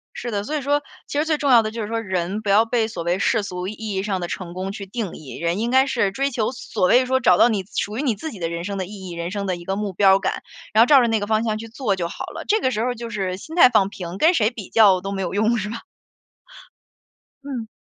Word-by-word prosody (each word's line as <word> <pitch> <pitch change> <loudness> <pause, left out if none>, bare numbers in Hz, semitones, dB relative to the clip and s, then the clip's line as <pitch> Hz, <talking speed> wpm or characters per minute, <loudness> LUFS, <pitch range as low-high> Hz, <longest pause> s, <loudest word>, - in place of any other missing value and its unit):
是 240 - -5
的， 200 -1 -2
所 305 +7 -4
以 - - -3
说 290 +2 +1 0.3
其 - - -4
实 305 - +1
最 315 -2 +1
重 285 -3 +1
要 235 -2 +8
的 215 - -3
就 230 0 -5
是 210 - -3
说， 230 0 -2
人， 190 0 -2
不 210 - -4
要 210 +3 +5
被 225 -1 0
所 190 -6 -6
谓 175 +3 0
世 225 -1 +1
俗 180 -1 -5
意 210 - -4 0.2
义 190 - -1
上 195 -3 -1
的 175 - -3
成 175 -1 -6
功 185 +2 -4
去 200 -1 -7
定 200 -1 -4
义。 135 -6 -9
人 170 +4 -1
应 235 +2 -1
该 265 +1 +5
是 230 -7 0
追 275 +5 -1
求 230 -2 -1
所 220 -6 -1
谓 255 +5 +5
说 260 +1 +1
找 180 -7 +4
到 240 - +6
你 205 -4 -1
属 210 +3 -2
于 - - -1
你 255 -7 0
自 315 +10 -6
己 210 - -10
的 165 -1 -2
人 170 0 -4
生 200 +2 -4
的 185 - -2
意 195 -1 -9
义、 - - -7
人 170 0 -4
生 200 -1 -3
的 185 -2 -1
一 175 - -10
个 190 +2 -2
目 205 -1 -3
标 195 +1 +5
感， 190 - -2 0.3
然 220 - +6
后 - - +8
照 280 -3 +7
着 240 - +2
那 225 -1 +1
个 205 - -4
方 220 +1 +1
向 215 -2 -1
去 225 - -8
做 225 -3 -1
就 170 -2 -2
好 - - -6
了。 - - -8
这 435 +1 +3
个 260 - +1
时 215 - -2
候 245 - 0
儿 245 - -1
就 230 0 -7
是 190 -4 -3
心 320 - -9
态 255 -8 +8
放 210 -5 +3
平， 180 -3 -7
跟 325 - +4
谁 220 -7 +3
比 225 -6 -9
较 200 -5 +5
都 195 +1 -5
没 195 -1 -3
有 185 - -3
用， 220 +3 +2
是 210 0 -3
吧？ 230 - -5 1.6
嗯。 255 -6 -5
210 Hz, 325 characters per minute, -22 LUFS, 190-240 Hz, 1.6 s, 要